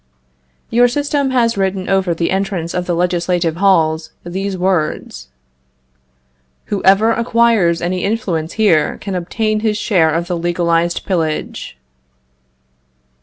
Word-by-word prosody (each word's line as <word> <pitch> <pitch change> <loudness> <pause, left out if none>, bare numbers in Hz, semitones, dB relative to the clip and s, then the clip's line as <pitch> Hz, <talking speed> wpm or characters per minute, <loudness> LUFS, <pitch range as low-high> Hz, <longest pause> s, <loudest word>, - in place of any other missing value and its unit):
Your 245 +1 +5
system 285 +2 -1
has 235 -4 +1
written 190 -1 -1
over 190 -3 +1
the 165 0 -1
entrance 190 -3 -2
of 180 0 -3
the 175 - 0
legislative 175 -1 0
halls 160 -4 +2 0.2
these 190 +2 -3
words: 160 - -2 1.5
"Whoever 200 +3 +4
acquires 230 -7 +2
any 180 +1 -1
influence 185 -7 -2
here 200 -9 +2
can 200 - -6
obtain 215 +5 -1
his 215 -1 0
share 175 -8 +2
of 165 +2 -1
the 180 - -2
legalized 170 0 0
pillage." 160 - -3
185 Hz, 120 wpm, -17 LUFS, 170-215 Hz, 1.5 s, Your